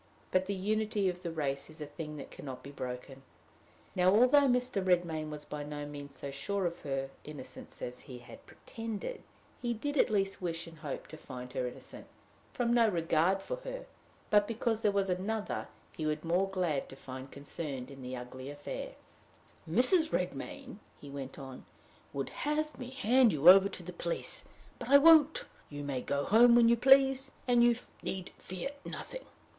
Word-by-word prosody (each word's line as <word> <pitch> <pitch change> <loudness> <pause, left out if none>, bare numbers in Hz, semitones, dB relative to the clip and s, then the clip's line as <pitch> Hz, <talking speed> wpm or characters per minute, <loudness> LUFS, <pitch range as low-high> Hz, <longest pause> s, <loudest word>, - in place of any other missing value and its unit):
But 185 0 +2
the 200 - -1
unity 210 0 0
of 180 0 -5
the 175 - -3
race 140 -3 -2
is 155 - -10
a 150 - -4
thing 150 +1 -7
that 140 - -8
can - - -11
not 130 -3 -7
be 140 - -9
broken. 130 0 -6 0.7
Now, 180 0 +4
although 255 +8 +6
Mr. 250 -5 +2
Redmain 170 -4 +1
was 150 -1 -7
by 150 - -5
no 145 0 -5
means 145 -1 -8
so 140 - -5
sure 190 +8 -2
of 170 0 -2
her 135 -1 -3
innocence 145 -4 -9
as 125 0 -5
he 125 - -10
had 120 - -13
pretended, 225 - -6 0.4
he 240 -1 -1
did 290 +6 -3
at - - +4
least 195 -3 0
wish 165 -2 -2
and 165 -2 -13
hope 150 -3 -5
to 155 - -9
find 125 -4 -9
her 125 -1 -1
innocent 125 - -9 0.4
from 240 -1 +1
no 230 -2 +5
regard 170 +2 +2
for - - -3
her, - - -7 0.5
but 205 -1 +5
because 230 -1 -1
there 210 - +3
was 200 -1 +1
another 200 +4 -2 0.3
he 155 - -2
would 155 0 -1
be 165 - -7
more 185 +3 +2
glad 175 -7 -1
to - - -9
find 130 0 -8
concerned 140 -2 -6
in 135 -1 -10
the 130 0 -5
ugly 130 +2 -7
affair. 145 0 -6 0.8
"Mrs. 315 - +3
Redmain," 200 - -3 0.2
he 145 - -10
went 135 -1 -6
on, 135 -2 -9 0.5
"would 135 -1 -3
have 300 0 -2
me 250 -1 -6
hand 255 -2 +4
you 150 +2 +2
over 195 +1 +9
to 180 - -8
the 180 +1 -7
police; 170 -1 -3 0.3
but - - -6
I 280 - +9
won't. 315 0 +6 0.2
You 145 -1 -6
may 135 -3 -2
go 140 +2 -1
home 235 +3 +7
when 235 -1 +7
you 235 - +6
please, 270 +2 +5 0.2
and 240 -1 +5
you 240 0 +5 0.3
need 185 -1 -4
fear 185 +9 -5
nothing." - - -7
180 Hz, 190 wpm, -32 LUFS, 145-230 Hz, 0.8 s, over